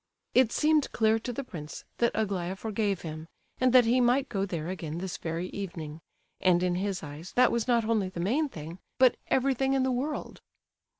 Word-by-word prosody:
It 255 -3 +5
seemed 305 -1 +2
clear 220 0 +3
to 245 +2 -4
the 275 +4 -4
prince 155 - -8 0.2
that 235 - +3
Aglaya 195 -4 -1
forgave 205 -2 -1
him, 155 0 -7 0.3
and 255 0 +4
that 250 -1 +7
he 245 +2 +3
might 250 +3 +3
go 195 0 -1
there 170 -4 -4
again 170 -4 -4
this 185 0 -4
very 170 +2 -3
evening; 165 -6 -6 0.4
and 180 -1 +3
in 180 -1 +1
his 190 0 -2
eyes 150 +4 -9
that 250 0 +5
was 235 0 0
not 235 -3 +3
only 215 -4 +1
the 180 - -7
main 265 - +1
thing, 165 - -8 0.2
but 255 -2 +5
everything 265 0 +2
in 270 -1 +2
the 260 - +1
world. 275 +5 -3
205 Hz, 195 wpm, -29 LUFS, 175-250 Hz, 0.4 s, that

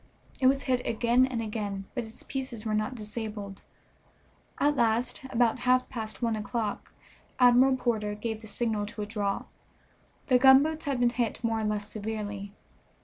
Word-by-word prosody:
It 260 - +4
was 275 +1 +3
hit 255 -2 0
again 240 +3 +3
and 235 -3 -3
again, 205 -3 -4
but 245 -3 -3
its 220 - -13
pieces 260 -5 -5
were 215 - -1
not 215 +4 -1
disabled. 210 -3 -6 1.0
At 290 +1 +3
last, 240 +3 +1
about 235 -2 +2
half 255 0 +3
past 225 -1 -5
one 230 -1 +1
o'clock, 215 0 -3 0.5
Admiral 255 +1 +6
Porter 215 -4 -1
gave 220 +1 -4
the 220 - -11
signal 215 -1 -1
to 210 0 -7
withdraw. 205 -1 -2 0.8
The 255 -2 +4
gunboats 285 +5 +5
had 275 -3 -1
been 240 -1 +3
hit 235 -1 -2
more 225 -1 +1
or 220 - -1
less 210 -1 -2
severely. 205 -2 -5
230 Hz, 160 wpm, -28 LUFS, 210-255 Hz, 1.0 s, Admiral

